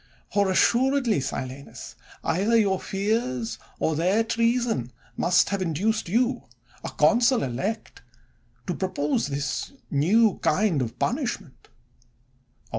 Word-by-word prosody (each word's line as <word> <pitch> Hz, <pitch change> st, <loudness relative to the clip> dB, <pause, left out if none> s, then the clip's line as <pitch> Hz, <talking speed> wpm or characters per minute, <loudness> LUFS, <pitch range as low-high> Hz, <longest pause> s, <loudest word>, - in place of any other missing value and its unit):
For 200 Hz, -1 st, +2 dB
assuredly, 245 Hz, -, +2 dB
Silanus, 130 Hz, +1 st, -6 dB, 0.3 s
either 210 Hz, +7 st, +2 dB
your 195 Hz, -4 st, +2 dB
fears, 195 Hz, -, -2 dB, 0.2 s
or 160 Hz, -, 0 dB
their 185 Hz, +8 st, +2 dB
treason, 230 Hz, -, 0 dB, 0.2 s
must 180 Hz, +1 st, +3 dB
have 200 Hz, -1 st, -2 dB
in 170 Hz, -3 st, -1 dB
duced 215 Hz, +4 st, -1 dB
you, 245 Hz, +5 st, +1 dB, 0.4 s
a -, -, -4 dB
consul 235 Hz, -, +3 dB
elect, 180 Hz, -, -4 dB, 0.6 s
to 180 Hz, -, -2 dB
propose 150 Hz, -7 st, -1 dB
this 140 Hz, -, -3 dB, 0.2 s
new 195 Hz, +9 st, +3 dB
kind 175 Hz, -3 st, +1 dB
of 115 Hz, -2 st, -4 dB
punishment. 240 Hz, -, -3 dB
195 Hz, 115 wpm, -25 LUFS, 145-230 Hz, 0.6 s, must